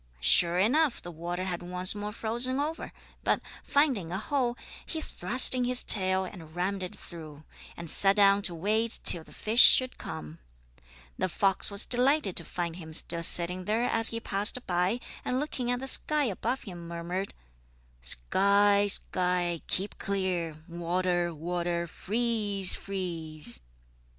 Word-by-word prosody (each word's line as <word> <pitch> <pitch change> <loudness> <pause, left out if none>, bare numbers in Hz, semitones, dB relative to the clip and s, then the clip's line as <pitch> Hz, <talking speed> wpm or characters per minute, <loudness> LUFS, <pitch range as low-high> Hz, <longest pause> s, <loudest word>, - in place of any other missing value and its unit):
Sure 170 - +2
enough 255 +8 +1
the 175 - -10
water 175 +2 -6
had 180 -2 -5
once 180 +1 +1
more 210 0 -6
frozen 240 +5 -1
over, 310 +3 -5 0.3
but, - - 0 0.2
finding 270 - 0
a 185 - -4
hole, 245 +2 -2 0.3
he 320 - -7
thrust 250 - +2
in 255 -1 0
his 250 0 -2
tail 190 -2 +3
and 165 -4 -12
rammed 190 +2 -3
it 180 - -7
through, 155 -3 -12 0.3
and 170 -2 -4
sat 195 0 +6
down 200 -1 +4
to 180 -4 -3
wait 215 +6 +3
till 170 - +8
the - - -19
fish 225 +3 +4
should 255 -1 +5
come. 80 0 -9 0.8
The 185 - -1
fox 195 +2 +1
was 200 0 +2
delighted 255 - +1
to 170 - +4
find 170 +1 -6
him 160 -3 -11
still 170 +1 0
sitting 175 +2 +6
there 220 +4 -1
as 225 -2 +3
he 230 - 0
passed 210 +4 0
by, 180 +6 -1 0.2
and 255 - -2
looking 265 -4 -5
at 245 0 -2
the 265 - -7
sky 300 +2 +2
above 240 +2 -4
him 175 -5 -10
murmured: 170 +3 -6 0.7
"Sky, 200 - +2
sky, 180 -3 -1
keep 195 +2 -3
clear! 185 -5 -3
Water, 175 0 -2
water, 170 +1 -4
freeze, 210 -1 -1
freeze!" 165 -8 -6
190 Hz, 155 wpm, -27 LUFS, 175-225 Hz, 0.8 s, till